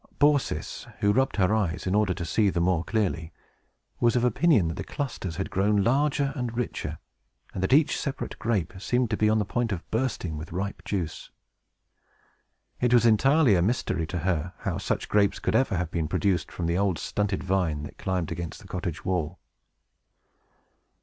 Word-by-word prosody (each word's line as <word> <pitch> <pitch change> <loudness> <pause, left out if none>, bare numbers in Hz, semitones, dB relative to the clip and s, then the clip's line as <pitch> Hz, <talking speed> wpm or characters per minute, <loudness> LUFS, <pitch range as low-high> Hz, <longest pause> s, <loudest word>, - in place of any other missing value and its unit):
Baucis 145 -2 +1
(who 100 - +4
rubbed 130 +3 +2
her 100 0 +3
eyes, 90 -6 0
in 90 - 0
order 105 -3 +2
to 85 - -4
see 105 +5 +2
the 90 - -1
more 85 -1 +2
clearly) 90 -6 -1 0.7
was 120 0 +3
of 120 - +2
opinion 125 - +3
that - - -2
the - - -5
clusters 120 - -4
had 95 - -4
grown 100 +1 +2
larger 140 +3 +2
and 120 -4 -3
richer, 125 - -3 0.6
and 95 - -4
that 95 - 0
each 150 +3 +5
separate 140 -1 -4
grape 105 -8 0
seemed 120 +3 0
to - - +2
be 105 0 +2
on 110 - +3
the 105 - +1
point 120 +2 -1
of 90 -4 -4
bursting 110 -9 -1
with 80 - -8
ripe 100 +4 -4
juice. 85 -6 -3 1.5
It 125 0 +3
was 120 -1 +5
entirely 135 +4 +5
a 90 - +3
mystery 90 -5 0
to 90 - -4
her 85 0 -1
how - - -2
such - - -2
grapes 100 -1 +2
could - - -1
ever 115 -5 +2
have 85 -1 -2
been 80 -2 -1
produced 90 0 0
from 85 - -4
the 85 +2 +1
old 100 -4 +1
stunted 105 -2 -2
vine 90 -6 0
that 75 - -10
climbed 90 -3 -2
against 85 -1 -5
the - - -13
cottage 90 -3 -4
wall. 90 -2 -1
100 Hz, 185 wpm, -27 LUFS, 90-120 Hz, 1.5 s, each